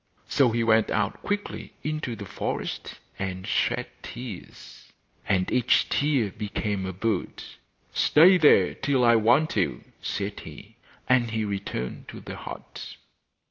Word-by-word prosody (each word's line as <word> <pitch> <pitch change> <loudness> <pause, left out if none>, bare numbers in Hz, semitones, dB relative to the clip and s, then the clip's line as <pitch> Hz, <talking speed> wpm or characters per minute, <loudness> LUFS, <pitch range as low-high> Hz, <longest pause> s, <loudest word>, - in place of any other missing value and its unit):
So 135 -3 +3
he 115 0 0
went 110 -1 +4
out 105 0 -1
quickly 205 0 -4
into 155 -6 -3
the 105 - -8
forest 90 - -4 0.2
and 95 -1 -4
shed - - 0 0.2
tears, 120 -6 -10 0.4
and 90 -2 +1
each 125 -2 +3
tear 140 -8 +1
became 105 -2 -3
a - - -3
bird. 100 +1 -2 0.5
'Stay 180 +5 +6
there 120 - +5
till 135 -3 +1
I 115 0 +6
want 120 +8 +3
you,' 95 -4 0 0.2
said 100 +1 -3
he; - - -12 0.3
and 125 -2 +3
he 110 -1 -1
returned 100 -11 -4
to - - -9
the - - -8
hut. - - -9
110 Hz, 140 wpm, -26 LUFS, 100-130 Hz, 0.5 s, Stay